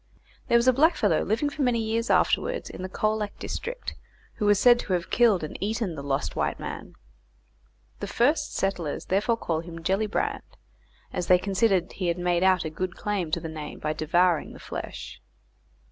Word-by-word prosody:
There 235 - +5
was 235 +2 +2
a 255 - +7
blackfellow 255 - +3
living 230 +8 0
for 295 - -5
many 245 -3 +2
years 225 +2 -1
afterwards - - +1
in - - -8
the 185 - -4
Colac 215 +1 -1
district - - -5 0.4
who 210 - 0
was 205 -1 +5
said 240 +2 +6
to 190 - -2
have 175 -1 -2
killed 225 -8 +4
and 155 - -5
eaten 215 -2 -1
the 150 - -6
lost 140 0 -2
white - - -1
man; - - -7 1.0
the - - -4
first 285 +7 +1
settlers 180 -6 -2
therefore 210 +5 +1
call 165 -7 -1
him 165 0 -8
Gellibrand, 200 +5 0 0.7
as 180 -1 -2
they 180 - +7
considered 195 -1 +1
he 185 - -3
had 170 0 0
made 175 -1 +1
out 185 -3 +3
a 155 - -3
good 180 +2 -4
claim 200 -5 -2
to 165 - 0
the 165 - -6
name 155 -2 -7
by 155 0 -2
devouring 170 +2 +1
the - - -12
flesh. - - -7
190 Hz, 185 wpm, -26 LUFS, 170-225 Hz, 1.0 s, a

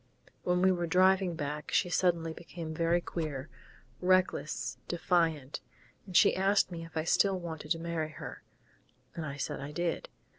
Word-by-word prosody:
When 180 0 +1
we 190 - +6
were 175 -2 0
driving 185 0 +4
back 150 -1 -4
she 185 - +3
suddenly 170 -3 +2
became 165 -1 -7
very 170 +2 +2
queer 155 -5 -4 0.5
reckless, 180 -10 +1
defiant.... 165 -5 0 0.5
And 185 - +2
she - - +6
asked 195 0 +3
me 165 -1 -5
if 165 0 -8
I 160 - +1
still 190 +3 +3
wanted 160 -3 -6
to - - -6
marry 165 -2 -2
her, - - -8 0.7
and 160 -2 -4
I 140 0 -5
said 145 +1 -3
I 140 +1 -5
did. 175 - -2
170 Hz, 160 wpm, -31 LUFS, 155-180 Hz, 0.7 s, we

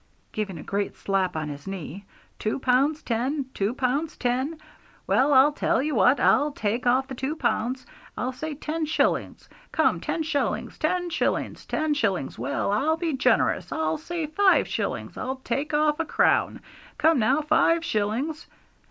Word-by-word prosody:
giving 205 -5 -3
a 155 - -8
great 200 0 -2
slap 190 -3 -1
on 155 -1 -2
his 145 +1 -8
knee. 195 0 -6 0.3
'Two 215 - -1
pounds 270 +4 +2
ten; 260 +5 -1
two 200 +2 0
pounds 275 +5 -1
ten! 260 +6 -1 0.5
Well, 275 +3 +3
I'll 275 +2 +6
tell - - 0
you 300 +3 -1
what, 250 +3 +4
I'll 295 +1 +3
take 235 -1 -2
off 260 +2 +3
the 265 - -7
two 265 +4 -3
pounds 255 -3 -1 0.3
I'll 255 - -1
say 305 +4 -5
ten 310 +2 -3
shillings! 315 - 0 0.2
Come, - - +2
ten 325 - -2
shillings! 300 -2 -2
Ten 355 +2 0
shillings! - - -1
Ten 310 -1 0
shillings! 200 - -1
Well, - - -1
I'll 295 +10 +1
be 330 -2 -1
generous, 255 -3 +1
I'll 160 0 -1
say 340 -2 -4
five 380 +6 +3
shillings; - - -3
I'll 260 +1 -3
take 285 +2 -2
off 300 0 +2
a 330 - 0
crown. - - +2 0.4
Come 320 -3 +4
now, 240 +7 +3
five 330 +2 +3
shillings!' 245 +8 -2
270 Hz, 165 wpm, -25 LUFS, 220-310 Hz, 0.5 s, I'll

